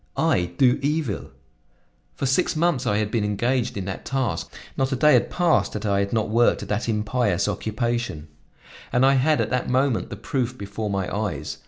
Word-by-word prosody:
I, 90 - +2
do 125 -2 +4
evil! 145 -6 -1 0.9
For - - -3
six 135 +8 +1
months 155 -6 +1
I 105 - +2
had 105 0 -1
been 115 -2 0
engaged 120 +3 0
in 95 - -3
that 95 -1 -5
task, 130 -5 -2 0.2
not 135 +1 0
a - - +1
day 150 +4 +5
had - - +3
passed 175 -2 +2
that 105 0 -4
I 100 -1 +2
had 100 0 -1
not 110 -2 0
worked 115 -1 +3
at 100 - -9
that 105 +3 -1
impious 105 -3 0
occupation, 110 -5 -2 0.6
and 125 +2 +3
I 135 - +5
had 145 +3 +3
at - - -1
that 125 0 -1
moment 130 -1 +1
the - - -5
proof 125 +3 -3
before 105 +1 -5
my 95 -2 -1
eyes. 105 -1 -3
120 Hz, 195 wpm, -24 LUFS, 105-130 Hz, 0.9 s, day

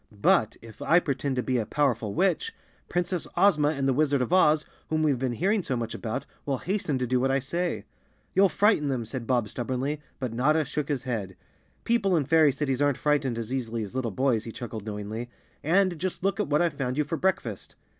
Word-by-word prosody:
But 105 +1 +2
if 115 -1 -13
I 170 - +5
pretend 140 -3 -2
to 125 - 0
be 130 -2 0
a 110 - -1
powerful 120 -8 0
witch, 195 - +1 0.3
Princess 175 0 -1
Ozma 155 -7 +4
and 140 -3 0
the 135 - +3
Wizard 145 0 +2
of 125 +7 -1
Oz, 155 -4 +4 0.2
whom 155 0 +1
we've 140 -5 +2
been 130 -2 -1
hearing 195 - +1
so 130 -7 -2
much 115 -1 -3
about, 120 +4 -4 0.2
will 140 -2 -1
hasten 180 -4 -1
to 125 - -1
do 125 +1 +1
what 135 +2 +1
I 135 - +3
say." 170 +6 -2 0.5
"You'll 195 +1 +5
frighten 205 -8 +3
them," 130 -4 -1
said 115 +1 -6
Bob 120 -4 +1
stubbornly, 130 +6 -3 0.2
but 130 -4 -3
Notta 150 +6 +2
shook 145 +1 -3
his 140 -3 -1
head. 105 -7 -3 0.5
"People 200 -6 +2
in 145 - +1
fairy 160 0 +5
cities 135 -1 -1
aren't 145 -2 +2
frightened 145 -6 +1
as 115 +2 -4
easily 115 -3 -2
as 100 - -8
little 130 -2 -1
boys," 115 +1 +1
he 115 - -6
chuckled 110 -2 -7
knowingly. 105 +3 -5 0.3
"And 180 +1 +2
just 185 +1 -3
look 195 +1 0
what 150 -5 +2
I've 170 -3 +1
found 130 -2 -3
you 150 - +3
for 150 +3 -3
breakfast!" 155 - -2
135 Hz, 215 wpm, -27 LUFS, 120-160 Hz, 0.5 s, I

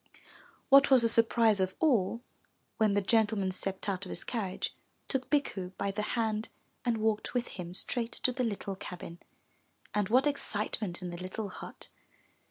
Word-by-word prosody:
What 275 0 +7
was 260 -3 +7
the - - +6
surprise 230 -2 +4
of 185 0 0
all, 235 - +2 0.6
when 215 -3 +3
the 205 - +2
gentleman 210 -2 +2
stepped 190 +1 -2
out 195 -1 -1
of 185 - -7
his 175 - -1
carriage, 200 -6 -3 0.3
took 265 -1 -2
Bikku 195 -11 -1
by 200 0 -1
the 205 +2 -3 0.2
hand 220 -1 0 0.3
and 235 -2 +1
walked 220 +2 -1
with 245 0 0
him 175 -2 -6
straight 230 +5 -1
to 255 - +1
the 255 0 -1
little 200 -3 -3
cabin, 175 -2 -8 0.7
and 205 -2 0
what 255 +5 +4
excitement 210 -9 0
in 180 - -4
the 175 - -6
little 200 +3 -4
hut! - - -7
215 Hz, 170 wpm, -31 LUFS, 190-235 Hz, 0.7 s, What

